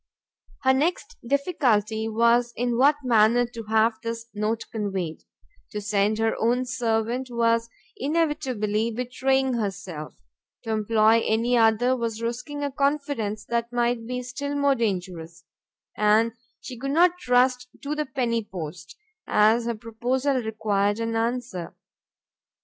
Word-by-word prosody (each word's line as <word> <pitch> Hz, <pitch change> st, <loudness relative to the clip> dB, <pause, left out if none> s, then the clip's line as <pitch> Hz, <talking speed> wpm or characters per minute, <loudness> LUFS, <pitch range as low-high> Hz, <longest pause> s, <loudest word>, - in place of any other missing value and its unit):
Her 265 Hz, 0 st, +5 dB
next 350 Hz, -, -1 dB
difficulty 235 Hz, -, +1 dB
was 235 Hz, +2 st, +3 dB
in 245 Hz, 0 st, -1 dB
what 280 Hz, +5 st, +5 dB
manner 235 Hz, 0 st, +4 dB
to 235 Hz, -1 st, -8 dB
have 220 Hz, +1 st, +2 dB
this 230 Hz, 0 st, -4 dB
note 215 Hz, +2 st, -1 dB
conveyed; 190 Hz, -7 st, -3 dB, 0.5 s
to 210 Hz, -, -3 dB
send 205 Hz, +1 st, +1 dB
her 225 Hz, 0 st, +1 dB
own 245 Hz, +3 st, +2 dB
servant 240 Hz, 0 st, -1 dB
was 230 Hz, -1 st, +1 dB, 0.3 s
inevitably 265 Hz, -8 st, 0 dB
betraying 260 Hz, +3 st, 0 dB
herself, 195 Hz, -8 st, -4 dB, 0.5 s
to 225 Hz, -, -4 dB
employ 220 Hz, +1 st, +3 dB
any 230 Hz, +3 st, +1 dB
other 230 Hz, +2 st, +3 dB
was 230 Hz, -3 st, -3 dB
risking 250 Hz, +6 st, -4 dB
a 285 Hz, -, -1 dB
confidence 275 Hz, -7 st, -1 dB
that 235 Hz, +1 st, -2 dB
might 240 Hz, -1 st, 0 dB
be 250 Hz, 0 st, -3 dB
still 285 Hz, +3 st, -4 dB
more 280 Hz, -1 st, +3 dB
dangerous, 180 Hz, -8 st, -3 dB, 0.5 s
and 215 Hz, +2 st, +3 dB, 0.3 s
she 250 Hz, -3 st, -9 dB
could 275 Hz, +2 st, -3 dB
not 350 Hz, +4 st, +3 dB
trust 250 Hz, -2 st, +2 dB, 0.2 s
to 285 Hz, +1 st, -2 dB
the 300 Hz, -1 st, -2 dB
penny 240 Hz, -3 st, -1 dB
post, 175 Hz, -, -8 dB, 0.3 s
as 220 Hz, +3 st, +4 dB
her 235 Hz, 0 st, -1 dB
proposal 250 Hz, +4 st, -1 dB
required 210 Hz, -2 st, 0 dB
an 230 Hz, 0 st, -2 dB
answer. 225 Hz, -6 st, -3 dB
230 Hz, 135 wpm, -25 LUFS, 215-255 Hz, 0.5 s, Her